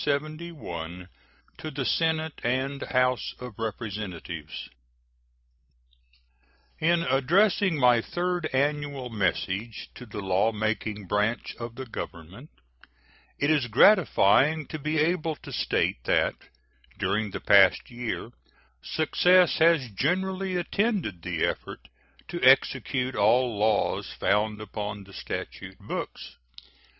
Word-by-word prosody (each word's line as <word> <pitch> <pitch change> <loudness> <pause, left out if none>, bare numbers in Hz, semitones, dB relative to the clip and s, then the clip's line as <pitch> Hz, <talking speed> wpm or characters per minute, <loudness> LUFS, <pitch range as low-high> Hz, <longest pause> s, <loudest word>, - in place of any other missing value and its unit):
To 140 - -4 0.6
the 135 -3 -4
Senate 160 +4 0
and 130 +3 -1
House 130 -1 0
of 125 -4 -9
Representatives: 100 -8 -5 2.1
In 170 +1 +2
addressing 170 +7 +2
my 125 -3 +5
third 175 +3 -2
annual 140 -2 -1
message 105 +1 -2
to 125 - -11
the 105 - -9
law 95 +3 +2
making 110 -1 -2
branch 105 +5 -1
of 115 -1 -6
the 130 - -6
Government 100 - -8 0.9
it 145 +2 +2
is 145 -5 +2
gratifying 150 - +4
to 155 - -5
be 155 +2 -1
able 160 0 +1
to - - -11
state - - 0
that - - +2 0.6
during 105 +1 0
the - - -5
past 100 +6 +5
year 120 -1 -4 0.5
success 180 +3 +3
has 160 -5 +4
generally 185 - -1
attended 180 - -1
the 85 -1 -1
effort - - -5 0.4
to 175 - -5
execute 130 0 +3
all 115 +3 +3
laws 105 0 +1
found 105 +1 +1
upon 105 -1 -5
the 100 0 -16
statute - - -6
books. - - -6
125 Hz, 110 wpm, -27 LUFS, 105-155 Hz, 2.1 s, my